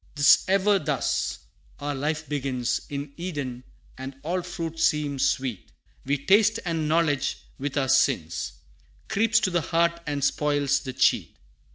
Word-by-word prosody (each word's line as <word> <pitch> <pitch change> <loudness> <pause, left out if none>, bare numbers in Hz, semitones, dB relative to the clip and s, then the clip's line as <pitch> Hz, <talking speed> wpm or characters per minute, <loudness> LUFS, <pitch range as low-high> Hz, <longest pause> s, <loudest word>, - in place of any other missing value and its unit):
'Tis 145 -1 +6
ever 195 +1 +3
thus 150 - -1 0.4
our 145 0 -3
life 150 +3 -2
begins, 130 -4 -1
In 140 0 -5
Eden, 145 -8 -5 0.4
and 135 +1 -6
all 180 +4 -1
fruit 170 -2 -5
seems 150 -4 +2
sweet 125 - -3 0.3
We 140 +2 +1
taste 205 +9 +4
and 165 -3 -1
knowledge, 150 -4 +1 0.2
with 140 +1 -3
our 135 -2 +1
sins, 115 - +1 0.6
Creeps 225 +2 +3
to 190 - +1
the 175 -1 +1
heart 170 +2 +1
and 145 -2 -2
spoils 145 -1 +1
the 130 -3 -6
cheat. 130 - +2
145 Hz, 145 wpm, -26 LUFS, 135-170 Hz, 0.6 s, Tis